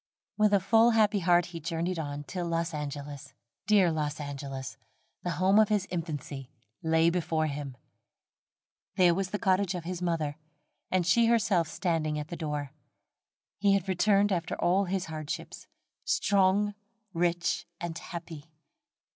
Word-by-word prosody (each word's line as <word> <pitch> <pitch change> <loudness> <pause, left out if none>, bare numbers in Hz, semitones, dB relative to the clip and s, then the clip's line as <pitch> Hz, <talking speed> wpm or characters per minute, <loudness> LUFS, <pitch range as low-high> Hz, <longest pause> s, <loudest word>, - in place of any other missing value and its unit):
With 210 -1 +3
a 200 - +5
full 225 +4 +5
happy 210 -1 +4
heart 175 -1 +3
he 165 - -5
journeyed 170 +2 -2
on, 145 -1 -4
till 175 +3 -4
Los 165 0 -1
Angeles, 145 -1 -6 0.3
dear 200 -5 +5
Los 150 -1 -2
Angeles, 140 -2 -6 0.5
the 175 - -3
home 190 +4 +4
of 215 - +5
his 205 -3 +1
infancy, 145 -6 -5 0.3
lay 160 +1 +3
before 165 -2 0
him. 140 -3 -5 1.2
There 180 -2 +5
was 190 +1 -2
the 210 - -2
cottage 190 -1 +1
of 175 - -4
his 180 +1 -5
mother, 160 -4 -1 0.5
and 185 -2 +1
she 230 +6 +4
herself 205 -8 +3
standing 155 -2 -1
at 150 +1 -5
the 175 - -5
door. 150 -4 -4 0.9
He 200 0 +4
had 195 -1 -1
returned 200 +2 +3
after 170 -3 -1
all 190 +3 +2
his 190 0 -2
hardships, 155 -2 -6 0.4
strong, 200 +1 +2 0.4
rich, 175 0 0
and 170 -2 -4
happy. 165 -2 -8
170 Hz, 145 wpm, -29 LUFS, 155-190 Hz, 1.2 s, a